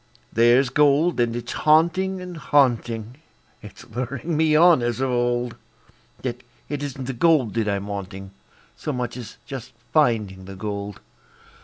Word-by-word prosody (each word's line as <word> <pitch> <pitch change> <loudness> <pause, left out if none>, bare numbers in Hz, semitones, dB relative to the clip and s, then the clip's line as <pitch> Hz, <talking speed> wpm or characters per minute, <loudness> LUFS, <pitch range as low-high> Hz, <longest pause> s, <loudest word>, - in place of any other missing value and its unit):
There's 120 +3 +4
gold, 150 +5 +3
and 120 -1 +1
it's 120 0 -5
haunting 170 +5 +2
and 180 -1 -7
haunting; 120 -6 +1 0.4
It's - - -12
luring 130 +7 -4
me 155 0 +3
on 170 -3 +6
as 120 0 -1
of 135 -1 0
old; 120 -1 0 0.7
Yet 125 -1 -3 0.3
it 145 -1 -3
isn't 135 -2 -5
the 135 - -3
gold 135 -4 +3
that 115 -2 0
I'm 100 -1 -1
wanting 95 -1 -6 0.4
So 150 - -4
much 125 -2 -3
as 125 -3 -9
just 130 -3 -8 0.2
finding 105 -11 +1
the 95 +1 -9
gold. 100 0 -5
125 Hz, 150 wpm, -23 LUFS, 115-150 Hz, 0.7 s, on